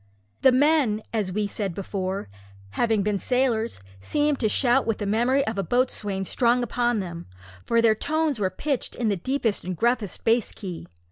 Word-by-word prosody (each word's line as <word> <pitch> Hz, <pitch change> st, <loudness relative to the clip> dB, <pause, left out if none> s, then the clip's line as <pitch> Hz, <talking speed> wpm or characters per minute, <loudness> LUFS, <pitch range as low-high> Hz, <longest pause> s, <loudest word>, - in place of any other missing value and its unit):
The 265 Hz, -, +6 dB
men, 260 Hz, -5 st, +3 dB
as 210 Hz, -4 st, -1 dB
we 210 Hz, +2 st, -1 dB
said 200 Hz, -3 st, -3 dB
before, 190 Hz, -, -3 dB, 0.4 s
having 220 Hz, -, +1 dB
been 205 Hz, -1 st, 0 dB
sailors, 240 Hz, -, 0 dB, 0.2 s
seemed 295 Hz, -, 0 dB
to 220 Hz, -, +1 dB
shout 250 Hz, +3 st, +2 dB
with 225 Hz, -, 0 dB
the 205 Hz, -, -4 dB
memory 240 Hz, +7 st, +2 dB
of 220 Hz, -, -1 dB
the 195 Hz, -, 0 dB
boatswain 205 Hz, -3 st, -1 dB
strong 245 Hz, +4 st, +2 dB
upon 240 Hz, -1 st, 0 dB
them, 170 Hz, -2 st, -7 dB, 0.4 s
for 230 Hz, 0 st, +2 dB
their 225 Hz, -1 st, +6 dB
tones 305 Hz, +2 st, -1 dB
were 190 Hz, -2 st, +1 dB
pitched 275 Hz, +8 st, -3 dB
in 235 Hz, -3 st, 0 dB
the 200 Hz, -, +1 dB
deepest 230 Hz, +2 st, -1 dB
and 185 Hz, -1 st, -4 dB
gruffest 235 Hz, -3 st, 0 dB
bass 230 Hz, 0 st, +2 dB
key. 185 Hz, -5 st, -7 dB
225 Hz, 180 wpm, -25 LUFS, 200-250 Hz, 0.4 s, The